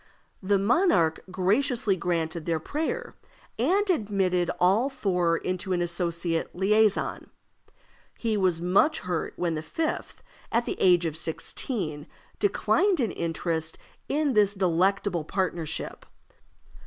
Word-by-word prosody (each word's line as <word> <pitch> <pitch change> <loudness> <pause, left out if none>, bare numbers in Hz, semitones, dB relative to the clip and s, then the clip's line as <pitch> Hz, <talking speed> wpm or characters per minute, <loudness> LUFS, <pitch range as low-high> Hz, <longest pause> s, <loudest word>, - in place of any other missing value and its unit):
The 200 +1 +2
monarch 195 - +2
graciously 205 +3 +1
granted 170 -2 -2
their 165 -1 +1
prayer, 320 - -3 0.5
and 380 - +2
admitted 195 - +1
all 200 +9 +3
four 180 -9 +1
into 185 +2 -3
an 175 - 0
associate 170 -1 -2
liaison. 210 +2 +2 0.9
He 225 -2 -1
was 185 -4 +1
much 195 - +2
hurt 175 -3 -3
when 175 -2 -1
the 155 - -3
fifth, 315 - -4 0.3
at 235 +1 +1
the - - -4
age 180 -2 +5
of 160 -2 -2
sixteen, 160 - -4 0.3
declined 305 - +2
an 230 -7 +1
interest 165 -1 -2 0.3
in 290 -1 +1
this 205 -2 +3
delectable 185 -1 +1
partnership. 165 -2 -3
185 Hz, 115 wpm, -27 LUFS, 170-220 Hz, 0.9 s, age